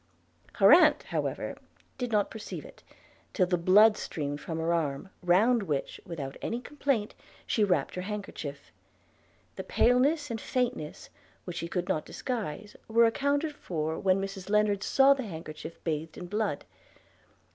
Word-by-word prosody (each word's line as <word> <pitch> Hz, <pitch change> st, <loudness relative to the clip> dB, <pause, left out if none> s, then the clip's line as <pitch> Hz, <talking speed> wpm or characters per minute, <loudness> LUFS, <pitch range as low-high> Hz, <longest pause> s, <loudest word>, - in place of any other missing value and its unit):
Her 195 Hz, +7 st, +7 dB
aunt, 305 Hz, -3 st, +6 dB
however, -, -, -3 dB, 0.4 s
did 245 Hz, -2 st, -2 dB
not 210 Hz, -2 st, +1 dB
perceive 220 Hz, -, -7 dB
it, -, -, -14 dB, 0.5 s
till 185 Hz, -, +3 dB
the 180 Hz, 0 st, +1 dB
blood 205 Hz, +5 st, +6 dB
streamed 145 Hz, -1 st, -4 dB
from 160 Hz, -, -4 dB
her 165 Hz, +1 st, 0 dB
arm, 155 Hz, +1 st, -2 dB
round 210 Hz, +7 st, +4 dB
which, 150 Hz, -8 st, -3 dB
without 145 Hz, -6 st, -6 dB
any 235 Hz, -, -2 dB
complaint, 260 Hz, -5 st, -1 dB, 0.3 s
she 215 Hz, -, +1 dB
wrapped 190 Hz, -3 st, +1 dB
her 180 Hz, -, -4 dB
handkerchief. 185 Hz, -8 st, -6 dB, 0.9 s
The -, -, -4 dB
paleness 275 Hz, +4 st, +2 dB
and 225 Hz, -2 st, -4 dB
faintness, 240 Hz, -12 st, -3 dB, 0.3 s
which 175 Hz, -2 st, -6 dB
she 170 Hz, -, -3 dB
could 180 Hz, +1 st, -2 dB
not 155 Hz, -5 st, 0 dB
disguise, 210 Hz, -, -5 dB
were 230 Hz, +1 st, +5 dB
accounted 285 Hz, +6 st, 0 dB
for 160 Hz, -, -3 dB
when 190 Hz, -1 st, +2 dB
Mrs 195 Hz, -1 st, -5 dB
Lennard 210 Hz, -1 st, +2 dB
saw 270 Hz, +6 st, +5 dB
the 275 Hz, -, -4 dB
handkerchief 160 Hz, -2 st, -8 dB
bathed 160 Hz, -1 st, -3 dB
in 180 Hz, -, -6 dB
blood. 205 Hz, -4 st, -2 dB
195 Hz, 150 wpm, -29 LUFS, 165-235 Hz, 0.9 s, Her